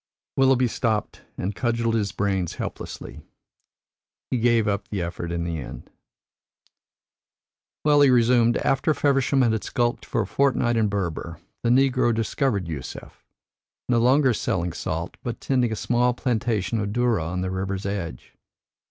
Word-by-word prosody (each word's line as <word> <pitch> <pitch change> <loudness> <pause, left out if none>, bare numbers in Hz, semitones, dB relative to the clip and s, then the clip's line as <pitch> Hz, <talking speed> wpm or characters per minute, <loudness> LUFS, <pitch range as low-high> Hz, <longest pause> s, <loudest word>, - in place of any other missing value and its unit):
Willoughby 130 -1 +4
stopped 110 -2 -2 0.2
and 95 +3 -2
cudgelled 115 0 0
his 105 -4 0
brains 95 -3 -1
helplessly. - - -7 1.1
He 125 - +1
gave 115 -2 +3
up 100 0 -1
the 100 - -3
effort 85 0 -4
in 85 0 -2
the 85 -2 -3
end. 65 - -9 1.9
"Well," 145 -1 +5
he 140 - +7
resumed, 120 -1 +4
"after 135 +3 +1
Feversham 135 -1 +2
had 110 -3 +1
skulked 120 0 -1
for - - 0
a - - -2
fortnight 130 -4 +1
in 110 -2 +2
Berber, 85 -4 -3 0.2
the 120 - 0
negro 125 -2 +3
discovered 110 - 0
Yusef, 75 -6 -8 0.6
no 120 -1 +3
longer 130 +2 +4
selling 90 -5 -1
salt, 85 +2 -4
but 120 -2 -5
tending 125 -4 +1
a - - -1
small 120 +2 +1
plantation 115 -3 -1
of 100 -1 -2
dhurra 120 -7 +1
on 90 +2 -3
the 95 0 -2
river's 95 +1 -3
edge. 95 -9 -5
115 Hz, 145 wpm, -24 LUFS, 95-125 Hz, 1.9 s, he